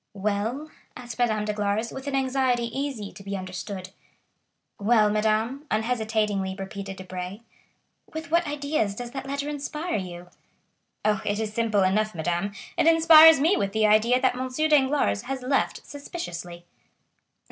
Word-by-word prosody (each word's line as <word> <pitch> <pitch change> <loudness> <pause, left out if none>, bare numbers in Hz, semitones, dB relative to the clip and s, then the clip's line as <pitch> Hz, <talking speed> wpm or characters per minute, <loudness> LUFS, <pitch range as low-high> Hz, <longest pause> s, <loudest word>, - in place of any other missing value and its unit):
"Well?" 215 +9 -2 0.3
asked 240 -1 -9
Madame 215 -3 +1
Danglars, 210 +2 -1
with 265 +1 -8
an 280 - -1
anxiety 260 -3 0
easy 270 -8 -3
to - - -12
be 195 0 -4
understood. 185 0 -6 0.9
"Well, 210 0 +4
madame?" 220 +7 0
unhesitatingly 215 -4 0
repeated 195 0 -6
Debray. 185 +2 -7 0.7
"With 315 0 -7
what 340 0 +2
ideas 285 -8 -1
does 240 +1 -6
that 270 +1 -6
letter 280 +1 -3
inspire 300 +3 -3
you?" 175 -2 -7 0.8
"Oh, 210 -1 +2
it 205 +1 -1
is 215 -1 -3
simple 220 -3 +1
enough, 215 +2 +1
madame; 175 +4 -1 0.3
it - - +4
inspires 320 -2 +8
me 330 +8 +3
with 200 0 -1
the 220 0 +2
idea 215 +4 +4
that 255 -1 +2
M. 255 +1 -3
Danglars 280 - +2
has 270 -1 -4
left 270 +2 0
suspiciously." 175 - -7
220 Hz, 145 wpm, -25 LUFS, 200-275 Hz, 0.9 s, inspires